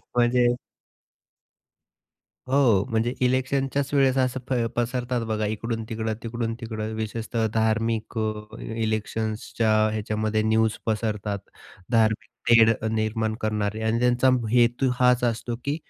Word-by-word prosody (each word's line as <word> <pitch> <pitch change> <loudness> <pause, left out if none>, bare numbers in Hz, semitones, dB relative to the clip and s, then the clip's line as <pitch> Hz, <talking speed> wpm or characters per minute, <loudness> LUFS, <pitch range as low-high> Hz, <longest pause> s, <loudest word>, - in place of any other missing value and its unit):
म्हणजे 120 0 +4 2.0
हो, 125 -8 +4
म्हणजे 115 +2 +1
इलेक्शनच्याच 135 +2 0
वेळेस 135 -2 +3
असं 130 0 0
फै 120 -3 +1
पसरतात 120 0 -1
बघा 110 -1 -1
इकडू-तिकडं, 110 0 -3
तिकडून-तिकडं 115 -1 -4
विशेषतः 110 +1 -2
धार्मिक 110 0 0
अ, 110 0 -3
इलेक्शन्सच्या 110 0 -2 0.2
ह्याच्यामध्ये 110 0 -1
न्यूज 110 0 +2
पसरतात 105 -2 -1 0.5
धार्मिक 110 -1 +2 0.2
तेढ 115 -1 +7 0.2
निर्माण 110 0 -1
करणारे 110 0 -1
आणि 110 +1 +1
त्यांचा 125 +1 +3 0.2
हेतू 120 +2 +3
हाच 125 -1 +4
असतो, 120 0 -1
की 140 +2 -1
115 Hz, 105 wpm, -25 LUFS, 110-120 Hz, 2.0 s, तेढ